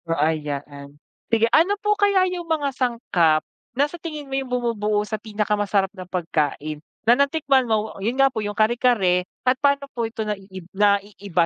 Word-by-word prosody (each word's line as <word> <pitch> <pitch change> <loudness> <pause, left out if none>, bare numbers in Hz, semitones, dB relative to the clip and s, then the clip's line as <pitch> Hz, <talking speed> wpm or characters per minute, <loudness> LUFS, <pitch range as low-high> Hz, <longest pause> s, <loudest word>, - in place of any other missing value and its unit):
So, 165 - -1
ay 155 +1 +1
yaan. 145 0 -7 0.3
Sige, 230 0 +3
ano 380 +6 +4
po 420 +1 +1
kaya 405 -2 +3
yung 345 -2 -6
mga 290 -4 0
sangkap 230 - +1 0.4
na 280 - +4
sa 340 +2 -11
tingin 305 -3 -6
mo 270 - -9
yung 270 -1 -2
bumubuo 215 -4 0
sa 215 -1 -4
pinakamasarap 205 -2 0
na 185 -2 -10
pagkain 155 -4 -2 0.2
na 235 - +7
natikman 275 -2 +2
mo? 220 0 0
Yun 230 +6 -1
nga 270 -1 +4
po 220 - -2
yung 205 0 -4
kare-kare 215 -5 +3 0.2
at 255 - +5
paano 280 -1 +2
po 235 - -2
ito 220 -1 -4
naiib 190 -3 -6
naiiba 200 -3 +1
215 Hz, 180 wpm, -23 LUFS, 190-270 Hz, 0.4 s, na